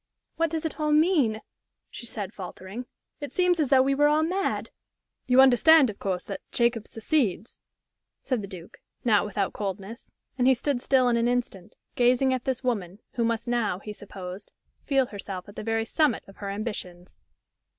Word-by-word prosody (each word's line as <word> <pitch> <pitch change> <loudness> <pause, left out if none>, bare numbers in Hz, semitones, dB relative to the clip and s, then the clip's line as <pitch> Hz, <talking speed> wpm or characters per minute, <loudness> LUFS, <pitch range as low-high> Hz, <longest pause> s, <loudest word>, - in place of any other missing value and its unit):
"What 330 0 +1
does 325 0 -3
it 320 - -4
all 300 0 +1
mean?" 300 -9 +3 0.5
she 235 - -8
said, 205 -3 -5
faltering. 190 +5 -8 0.3
"It 290 - -6
seems 360 -2 +2
as 295 -5 +1
though 265 -2 +6
we 275 +1 +2
were 290 +2 +4
all 305 +1 +3
mad." 375 +4 -1 0.6
"You 250 +1 +4
understand, 265 +1 +6
of 200 - -16
course, 185 -2 -2
that 200 - -6
Jacob 235 -2 +1
succeeds?" 225 - -1 0.6
said 255 -5 -1
the 200 - -6
Duke, 185 +2 -11 0.3
not 210 -3 +4
without 205 - -2
coldness; 200 +2 -6 0.3
and 250 - +4
he 265 - +6
stood 250 +1 -1
still 260 -1 +3
an 235 -1 +2
instant, 240 -7 -2 0.2
gazing 250 +2 +3
at 255 0 -3
this 265 -1 -2
woman, 200 -7 -2
who 235 - -1
must 230 -1 -1
now, 235 -6 0
he 210 +2 -8
supposed, 190 -1 -8 0.4
feel 275 -2 +3
herself 195 -4 -7
at 205 - -13
the - - -5
very 225 +1 -1
summit 305 +5 +1
of 195 - -15
her 200 - -5
ambitions. 195 -4 -6
235 Hz, 180 wpm, -26 LUFS, 200-270 Hz, 0.6 s, though